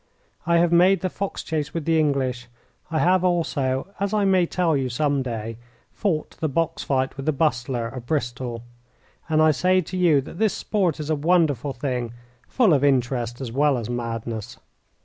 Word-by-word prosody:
I 170 0 +4
have 170 0 +3
made 180 +3 +5
the 185 - -2
fox 200 -1 -4
chase 150 -2 -3
with 165 -3 -3
the 165 -1 +3
English. 130 -5 0 0.4
I 160 - -1
have 185 +2 +3
also, 160 -5 0
as 200 +1 -1
I 205 -1 +2
may 185 -3 +3
tell 170 -4 +1
you 135 -2 -1
some 140 +2 0
day, 115 -3 -5 0.3
fought 170 -8 -2
the 155 - 0
box 165 +3 -1
fight 130 -1 -1
with 135 - -6
the - - +4
Bustler, 130 -5 0
of 120 0 -9
Bristol. 120 -4 -3 0.7
And 155 0 +3
I 155 - +6
say 185 +6 +2
to 180 +2 -7
you 170 -6 +4
that 150 - -10
this 220 -2 +2
sport 185 -8 0
is 155 +1 -3
a - - +2
wonderful 150 -4 +1
thing 125 -3 -3 0.3
full 225 -9 +3
of 140 -2 +2
interest 125 -3 +1
as 125 -4 -5
well 140 +2 +2
as 120 0 -4
madness. 115 -2 -4
145 Hz, 190 wpm, -23 LUFS, 125-170 Hz, 0.7 s, I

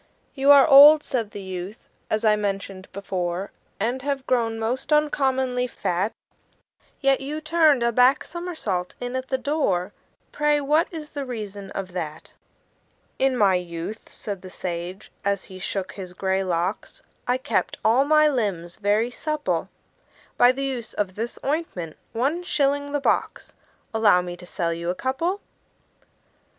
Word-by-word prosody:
"You 275 0 +1
are 285 0 +9
old," 295 +1 +9
said 230 -5 -2
the 200 -1 -8
youth, 190 +3 -7 0.2
"as 215 +1 0
I 215 -1 +5
mentioned 195 -2 -4
before, 185 -1 -3 0.3
And 240 +5 -1
have 275 -1 -2
grown 230 -3 +1
most 235 +6 -3
uncommonly 265 -4 +2
fat; 190 -2 -1 0.9
Yet 275 -1 +2
you 295 +3 -4
turned 310 -4 +3
a 235 - +2
back 250 +4 +4
somersault 315 - -4
in 245 +1 -4
at 260 0 -3
the 265 - 0
door 245 - 0 0.4
Pray, 295 0 +2
what 300 +4 +2
is 310 -3 -7
the 285 - -4
reason 210 -6 -6
of 190 -2 -5
that?" 160 -3 -6 0.9
"In 265 -1 +2
my 200 -4 +4
youth," 175 +4 -4
said 200 -3 -6
the 185 - -10
sage, 180 +2 -6
as 200 -1 0
he 185 -1 -11
shook 190 0 -3
his 185 -3 -8
gray 190 +1 0
locks, 180 +2 -3 0.2
"I 250 +1 +2
kept 260 - -1
all 240 +5 +5
my 305 +1 +5
limbs 200 - -2
very 215 +3 +1
supple 305 +3 -2 0.7
By 245 - +6
the 270 +2 -4
use 255 -4 -4
of 200 -3 -1
this 230 +4 -4
ointment 275 - -2 0.2
one 275 +9 0
shilling 285 -4 0
the 290 - 0
box - - -1 0.4
Allow 210 -5 +4
me 175 0 -6
to 180 0 -12
sell 170 -2 -1
you 170 +1 -4
a 180 - 0
couple." 330 - -1
230 Hz, 155 wpm, -24 LUFS, 190-275 Hz, 0.9 s, are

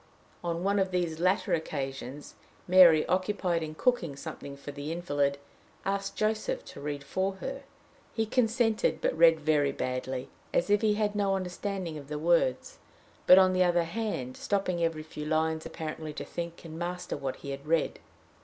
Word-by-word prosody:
On 170 0 -2
one 200 +1 +2
of 190 -1 +1
these 175 -3 -1
latter 185 +3 +2
occasions, 140 -3 -4 0.3
Mary, 175 -4 +7
occupied 185 -2 0
in 155 -1 -5
cooking 175 - +1
something 140 0 -8
for 140 +1 -8
the 145 +2 -5
invalid, 145 -5 0 0.5
asked 195 0 -2
Joseph 220 - -1
to - - -10
read 145 -1 -4
for 190 +7 -1
her. 270 +8 -6 0.5
He 225 - 0
consented, 225 -1 +1
but - - 0
read 165 -1 +6
very 150 -2 +2
badly 130 0 -3 0.3
as 180 - +2
if 205 0 +4
he 215 -2 +3
had 210 -1 0
no 200 -2 +1
understanding 185 -3 -4
of 140 - -12
the 150 +1 -4
words, 155 -5 +1 0.5
but, 180 - +10
on 185 -1 +6
the 185 0 +4
other 175 -1 +3
hand, 170 - -3
stopping 185 -4 0
every 165 -2 -1
few 150 -1 -7
lines, 160 0 0
apparently 155 -1 -6
to - - -6
think 170 0 -6
and 160 0 -8
master 180 +1 -3
what 135 -1 -3
he 140 - -7
had 140 +2 -7
read. 165 0 +1
170 Hz, 170 wpm, -29 LUFS, 150-195 Hz, 0.5 s, but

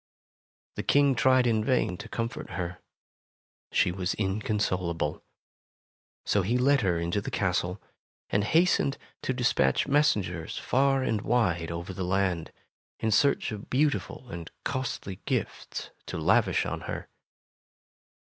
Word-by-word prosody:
The - - 0
King 140 -1 +4
tried 130 0 +4
in 110 -2 +2
vain 120 -6 +1
to - - -9
comfort 115 0 -4
her; 90 -1 -4 0.9
she - - +3
was 90 0 -2
inconsolable. 95 -6 -1 1.0
So 100 - +2
he 110 +7 +1
led 140 +2 +4
her 90 -4 +1
into 85 +4 -1
the - - -5
castle, 90 0 0 0.5
and 100 - +2
hastened 160 - +3 0.2
to - - -1
despatch 125 +1 +2
mes 145 +2 +4
sengers 90 -5 -4
far 135 +1 +2
and 110 -5 0
wide 90 -9 +1
over 85 +3 -5
the 95 - -4
land, 90 -2 0 0.5
in 110 - 0
search 140 +5 +3
of 105 -1 -7
beautiful 140 -2 0
and 85 -1 -6
costly 130 -8 -3
gifts - - -3 0.2
to - - -4
lavish - - +3
on - - -3
her. - - -4
105 Hz, 135 wpm, -28 LUFS, 90-130 Hz, 1.0 s, King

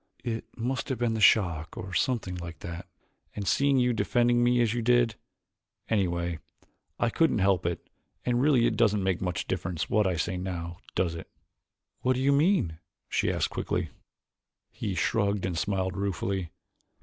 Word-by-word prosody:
It 115 -2 -3
must 125 +3 -2
have 130 - -1
been 120 -1 0
the 110 - -2
shock 85 -6 +3
or 95 +1 -6
something 115 -2 0
like 85 -2 -8
that, 85 +2 -7 0.5
and 100 -2 -4
seeing 140 +8 +3
you 125 -1 +3
defending 120 +3 +2
me 120 0 +3
as 115 -2 +2
you 120 - -1
did. 120 -1 +3 0.8
Anyway, 85 -6 0 0.6
I 120 - +1
couldn't 165 +6 +2
help 95 -3 +2
it 85 - -4 0.4
and 120 0 +2
really 135 -4 +4
it - - +1
doesn't 105 -3 +2
make 95 -2 0
much 90 -2 -2
difference 85 -2 -3
what 105 -2 +3
I 90 - 0
say 85 +2 -1
now, 85 -2 -4 0.2
does 85 -3 +1
it?" 85 - -8 0.7
"What 130 - +2
do 125 - -2
you 135 +2 +3
mean?" 140 - +2 0.3
she - - +1
asked - - -1
quickly. - - -2 0.8
He 110 -4 -4
shrugged 100 -1 +1
and 90 -2 -2
smiled 95 +1 -1
ruefully. 95 -2 -2
100 Hz, 170 wpm, -28 LUFS, 90-120 Hz, 0.8 s, really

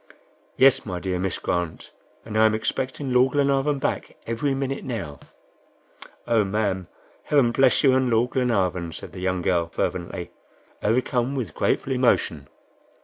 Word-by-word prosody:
"Yes, 135 0 +6
my 90 -4 -4
dear 90 -1 -2
Miss 95 -1 -1
Grant, 85 -2 -3 0.3
and 110 - -7
I 110 0 +6
am 110 - +1
expecting 130 +4 -2
Lord 125 +1 +4
Glenarvan 140 0 +2
back 135 - -3
every 125 +5 -1
minute 135 0 -3
now." 90 - -5 1.1
"Oh, 115 -3 +3
ma'am! 95 -3 -1 0.4
Heaven 135 -5 +3
bless 135 +3 +3
you 135 -2 +5
and 130 -1 +2
Lord 120 +2 +2
Glenarvan," 95 -9 0
said - - -8
the - - -9
young 95 -1 -1
girl, 85 -2 +1
fervently, 85 - -3 0.5
overcome 125 +3 0
with 115 - -3
grateful 135 - 0
emotion. 100 - +1
115 Hz, 145 wpm, -24 LUFS, 95-130 Hz, 1.1 s, Yes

